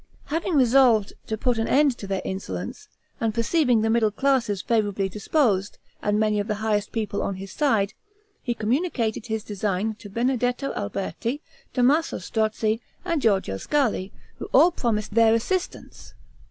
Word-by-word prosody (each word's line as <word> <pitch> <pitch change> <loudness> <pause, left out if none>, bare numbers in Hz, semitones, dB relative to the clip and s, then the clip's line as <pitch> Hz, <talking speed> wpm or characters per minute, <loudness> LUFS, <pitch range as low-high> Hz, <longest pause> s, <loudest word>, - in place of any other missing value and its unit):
Having 335 +1 0
resolved 245 -5 +4
to 220 - -2
put 240 0 0
an 225 - 0
end 280 -2 +3
to 200 - -6
their 195 -1 -2
insolence, 95 - -5 0.3
and 220 -2 -1
perceiving 245 0 +2
the 220 - +1
middle 225 -2 +3
classes 235 -3 +1
favorably 205 -4 +1
disposed, 205 - 0 0.2
and 210 0 +1
many 215 -1 +2
of 205 - -2
the 210 - -1
highest 210 -1 0
of - - -35
the 230 - 0
people 205 -2 -2
on 200 - -2
his 195 +1 -8
side, 220 -9 +1 0.5
he 240 - -2
communicated 230 -2 -1
his 220 -2 -2
design 205 0 -2
to 205 - -10
Benedetto 245 +4 0
Alberti, 225 - -3 0.4
Tommaso 280 +6 +2
Strozzi, 220 0 -1 0.2
and 335 -5 0
Georgio 190 - +1
Scali, 220 - 0 0.3
who - - -5
all 355 - +5
promised 215 - -2
their 225 0 +5
assistance. 355 +11 -4
220 Hz, 160 wpm, -24 LUFS, 205-250 Hz, 0.5 s, all